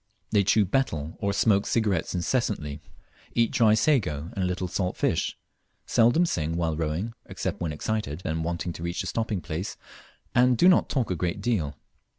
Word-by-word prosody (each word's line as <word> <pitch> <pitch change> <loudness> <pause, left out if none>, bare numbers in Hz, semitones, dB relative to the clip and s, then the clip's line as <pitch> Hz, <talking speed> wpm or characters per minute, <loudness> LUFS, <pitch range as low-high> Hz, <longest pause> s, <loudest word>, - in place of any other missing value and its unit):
They 105 -2 +4
chew 105 +2 +4
betel 85 - -1
or 100 - 0
smoke 100 0 +2
cigarettes 100 -7 0
incessantly; 85 - -1 0.5
eat 115 -1 +3
dry 110 -2 +4
sago 95 - +1
and 95 - -2
a - - +1
little 90 0 -2
salt 90 0 -2
fish; - - 0 0.5
seldom 120 +10 +4
sing 80 - -1
while 80 -2 0
rowing, 80 +8 -2
except - - -4
when 85 -3 -1
excited 90 0 -3
and 80 +1 -1
wanting 85 +1 -3
to - - -9
reach 85 +2 -2
a - - -7
stopping 105 +1 -2
place, 85 +3 -4 0.6
and 125 0 +4
do 175 - +5
not 185 - +5
talk 125 -8 0
a - - +1
great 85 +1 -2
deal. 85 - -1
95 Hz, 175 wpm, -26 LUFS, 80-110 Hz, 0.6 s, do